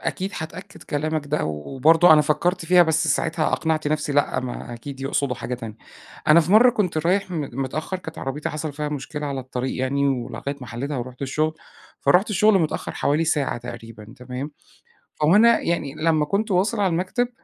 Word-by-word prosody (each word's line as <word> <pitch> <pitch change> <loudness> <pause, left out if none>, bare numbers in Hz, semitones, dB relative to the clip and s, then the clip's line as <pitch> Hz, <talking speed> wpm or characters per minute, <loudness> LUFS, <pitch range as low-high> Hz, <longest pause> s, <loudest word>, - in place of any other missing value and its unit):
أكيد 190 +2 -3
هاتأكّد 180 +5 -8
كلامك 155 0 -2
ده، 150 +1 -1
وبرضه 135 - +4
أنا 150 - +7
فكّرت 175 +4 0
فيها، 180 +1 +6
بس 160 -1 +1
ساعتها 155 +3 0
أقنعت 155 -2 0
نفسي 150 -1 -1
لأ، 145 0 +1
ما 120 -1 -6
أكيد 135 +3 -9
يقصدوا 135 -1 -1
حاجة 125 0 -4
تانية. 115 -3 -8 0.5
أنا 155 +2 +8
في 170 +3 -1
مرّة 240 +4 +7
كنت 180 -8 -1
رايح 190 +2 +1
م 170 -3 -2 0.2
متأخّر، 155 +7 -4
كانت 160 -3 -9
عربيتي 135 +3 -3
حصل 155 0 -4
فيها 150 +1 -3
مشكلة 150 +1 -5
على 140 -2 -3
الطريق 130 0 -4
يعني 140 +2 +1
ولغاية 135 +2 -3
ما 125 - -8
حَلّيتها، 130 +6 -4
ورُحت 125 +2 -6
الشغل. 155 +4 -1 0.5
فرُحت 190 +5 +3
الشغل 210 0 +4
متأخّر 160 -3 -2
حوالي 150 +3 +1
ساعة 145 -6 0
تقريبًا 115 -2 -10
تمام، 125 +3 -6 0.7
هو 165 +7 +5
أنا 235 +2 +6
يعني 150 -5 -2
لمّا 155 -1 +1
كنت 200 +8 -1
واصل 200 +4 +1
على 195 - +3
المكتب، 185 +9 0
150 Hz, 180 wpm, -23 LUFS, 135-170 Hz, 0.7 s, أنا